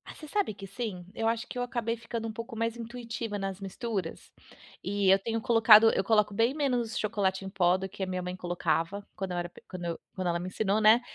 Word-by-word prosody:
Você 310 - -10
sabe 400 - 0
que 195 0 -9
sim? 195 -3 -5
Eu 225 - -1
acho 230 +1 0
que - - -7
eu - - 0
acabei 235 -1 -2
ficando 230 0 -5
um 220 - -4
pouco 230 +2 -7
mais 230 0 -1
intuitiva 230 -2 -5
nas 195 -1 -4
misturas. 195 -2 -4 0.5
E 195 0 +1
eu 195 - +4
tenho 225 +2 -2
colocado 225 -1 +7
eu - - +1
coloco 210 0 +3
bem 230 +6 +2
menos 245 -7 0
chocolate 195 -3 0
em - - -4
pó 180 -2 +3
do 190 0 -4
que 200 0 -10
a - - +1
minha 185 0 -2
mãe 180 0 -4
colocava, 175 +2 -1
quando 190 -2 -4
eu 175 - -2
era 175 0 -2
pe - - -16
quando 180 -2 -6
eu 170 -1 -3 0.2
quando 185 -1 -2
ela 170 - 0
me 180 - -5
ensinou, 205 +3 0
né. 220 +3 +7
210 Hz, 235 wpm, -29 LUFS, 190-230 Hz, 0.5 s, colocado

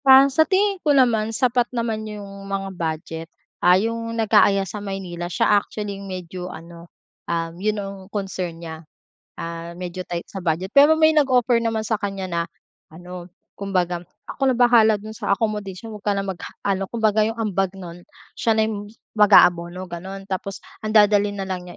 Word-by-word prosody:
Ah, 265 0 +9
sa 315 +2 +3
tingin 395 0 +2
ko 295 -3 +3
naman 225 -4 +3
sapat 245 +1 +1
naman 230 -3 -2
'yong 210 -1 -7 0.2
mga 195 0 -2
budget. 165 -1 -4 0.3
Ah, 180 +1 +6
'yung 230 +2 -2
nag-aaya 205 -3 +4
sa 205 +3 -6
Maynila 185 -3 -5
siya - - +1 0.2
actually 210 -1 -6
'yung 195 - -8
medyo 180 0 -6
ano, 170 0 -11 0.4
um, 165 -1 -1
'yun 215 +1 0
ang 195 -1 -5
concern 190 -4 -4
niya, 160 -1 -8 0.6
ah, 170 0 -6
medyo 180 0 -6
tight 170 -1 -3
sa 195 - -8
budget. 175 +3 -1
Pero 290 +3 +7
may 315 0 +5
nag-offer 255 -5 +3
naman 225 -1 -1
sa 220 0 -1
kanya 195 -1 -3
na 170 - +1 0.5
ano 175 +2 -10 0.3
kumbaga, 180 -3 0 0.2
"Ako 270 - -1
na - - -3
bahala 235 -3 +5
do'n 215 +1 -9
sa 200 -2 0
accommodation 210 -1 -3
huwag 210 -1 -10
ka 200 - +2
na 195 - -1
mag 190 -3 -5 0.2
ano," 195 -1 0
kumbaga 220 -2 +1
'yung 220 +2 +1
ambag 195 -4 -1
nun 175 -2 -9 0.4
siya 225 -1 +2
na 220 - +3 0.5
mag-aabono 180 -4 +5
gano'n. 190 +2 -7
Tapos 195 0 -5 0.2
ang 215 0 -1
dadalhin 205 -1 +4
na 195 - -3
lang 180 -1 -4
niya - - -11
200 Hz, 175 wpm, -22 LUFS, 180-225 Hz, 0.6 s, Ah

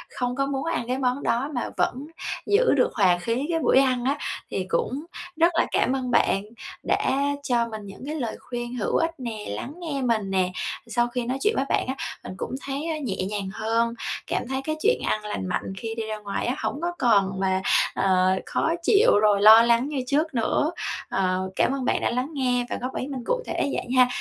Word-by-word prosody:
không 245 -1 -1
có 275 - +1
muốn 275 -1 -2
ăn 330 -8 -1
cái 255 +1 -1
món 255 +1 0
đó, 260 +5 0
mà 245 - -2
vẫn 270 +4 0 0.4
giữ 445 +5 +4
được - - +3
hòa 185 -4 +4
khí 230 +9 -1
cái 330 - +1
buổi 270 - +4
ăn 255 -2 +2
á. 275 +2 +1 0.3
Thì 185 - -2
cũng 255 - -1 0.3
rất 335 +1 +4
là 335 - +3
cảm 255 - +2
ơn 255 -2 -2
bạn 195 -4 +3 0.4
đã 265 - +1 0.3
cho 240 -4 +1
mình 220 -2 -6
những 195 +4 -10
cái 300 +2 -4
lời 240 -7 -3
khuyên 240 0 -5
hữu 225 - -1
ích 330 0 +1
nè, 230 -5 -5
lắng 105 - -5
nghe 305 -6 -3
mình 225 -5 0
nè, 185 -1 +1 0.4
sau 240 +1 +1
khi 240 0 -3
nói 255 +3 -1
chuyện 425 - +3
với 270 - +1
bạn - - +1
á, 260 - -2 0.3
mình - - -7
cũng - - -4
thấy, 280 +4 -3
a, 315 - -1
nhẹ 235 -9 -3
nhàng 200 -2 -3
hơn, 230 +2 0 0.3
cảm - - -2
thấy 265 0 -2
cái 310 +2 -2
chuyện 465 +4 +3
ăn 215 0 -1
lành 210 -2 -3
mạnh 180 +1 -2
khi 225 +2 -4
đi 225 - -3
ra 215 0 -4
ngoài 205 -1 -3
á, 250 - 0
hổng 290 - -3
có 345 +1 0
còn 195 -5 +3
mà, 190 0 +1 0.3
ờ, 185 -1 +3
khó 320 - 0
chịu 425 +5 +5
rồi 205 -2 +4
lo 220 +2 +10
lắng 235 +3 +3
như 275 -4 -2
trước 305 +3 +1
nữa, 265 +6 +1 0.4
ờ, 185 0 0
cảm - - +2
ơn 270 -2 -2
bạn - - +1
đã - - +1
lắng 250 +3 -1
nghe 250 -3 +1
và - - -2
góp 255 +1 -4
ý 255 - -3
mình 265 -4 -5
cụ - - 0
thể - - -4 0.2
vậy - - -3
ha. 250 - +7
245 Hz, 230 wpm, -25 LUFS, 215-275 Hz, 0.4 s, lo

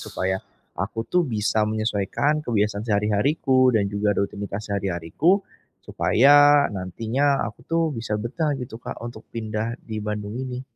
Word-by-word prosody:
supaya 95 +1 -2 0.4
aku, 110 +4 -2
tuh, 180 - +2
bisa 110 -2 0
menyesuaikan 110 +7 0
kebiasaan 105 -2 0
sehari-hariku 125 +5 +2
dan 105 -2 +3
juga 105 0 0
rutinitas 100 +1 -3
sehari-hariku, 100 - +1 0.4
supaya 145 +3 +5
nantinya 115 +9 0
aku, 110 - -9
tuh, 165 0 +1
bisa 115 -2 -3
betah, 145 +8 -1
gitu, 120 -2 -7
Kak, - - -6
untuk 120 -2 -8
pindah 110 0 -3
di 110 -1 -5
Bandung 105 0 -4
ini. 130 -1 -4
110 Hz, 135 wpm, -24 LUFS, 105-130 Hz, 0.4 s, supaya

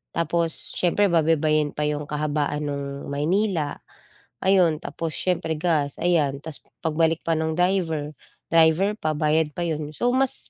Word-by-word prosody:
Tapos 170 0 -1
siyempre 190 +3 +2
babaybayin 155 -2 +2
pa 150 - -1
'yung 150 0 -2
kahabaan 150 0 -1
no'ng 140 -1 -5
Maynila. 165 +2 0 0.7
Ayun, 185 -4 +4
tapos 165 -1 -4
siyempre 165 -3 -1
gas, 150 -4 0
ayan. 155 -6 +1
Tapos 160 -2 -7 0.2
pagbalik 160 0 +1
pa 165 - +2
ng 160 0 -1
driver, 170 -5 0 0.4
driver 165 +5 +4
pa, 155 -5 -1
bayad 155 0 +2
pa 175 - -3
yun. 155 -2 -3
So, 240 +11 0
mas 270 0 +3
160 Hz, 145 wpm, -24 LUFS, 150-170 Hz, 0.7 s, Ayun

